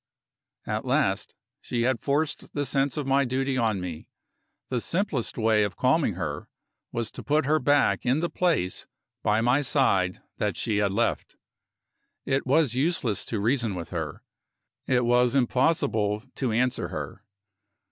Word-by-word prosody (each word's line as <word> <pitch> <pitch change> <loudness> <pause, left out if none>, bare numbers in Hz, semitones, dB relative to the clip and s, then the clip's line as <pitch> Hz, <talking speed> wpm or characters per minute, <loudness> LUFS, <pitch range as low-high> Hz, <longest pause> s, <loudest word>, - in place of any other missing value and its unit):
At - - -2
last, - - 0 0.3
she 120 -1 -2
had 130 -1 +1
forced 145 +2 -1
the 145 -1 0
sense 135 +1 0
of 150 - -2
my 135 +1 +3
duty 135 +1 -1
on 110 -5 +1
me. 90 -3 -7 0.6
The 125 -2 -1
simplest 170 - -1
way 110 -2 +3
of 100 -2 -2
calming 130 - +2
her 80 -5 -4 0.4
was 115 -1 -3
to - - -9
put 150 0 +2
her 155 +2 +3
back 145 -10 +2
in 130 +4 +2
the 170 - 0
place 165 - 0 0.3
by 105 +1 +2
my 125 +5 +3
side 100 -10 +2 0.2
that - - -1
she 105 - -1
had 100 -1 +2
left. 115 +4 -1 0.9
It 135 0 0
was 140 -2 +3
useless 130 - 0
to 110 - -2
reason 115 -1 +1
with 85 -2 -6
her, 80 -4 -4 0.6
it 125 -2 +2
was 125 +1 +3
impossible 125 -5 +1
to 130 -4 -1
answer 125 +3 +1
her. - - -6
125 Hz, 155 wpm, -26 LUFS, 105-140 Hz, 0.9 s, my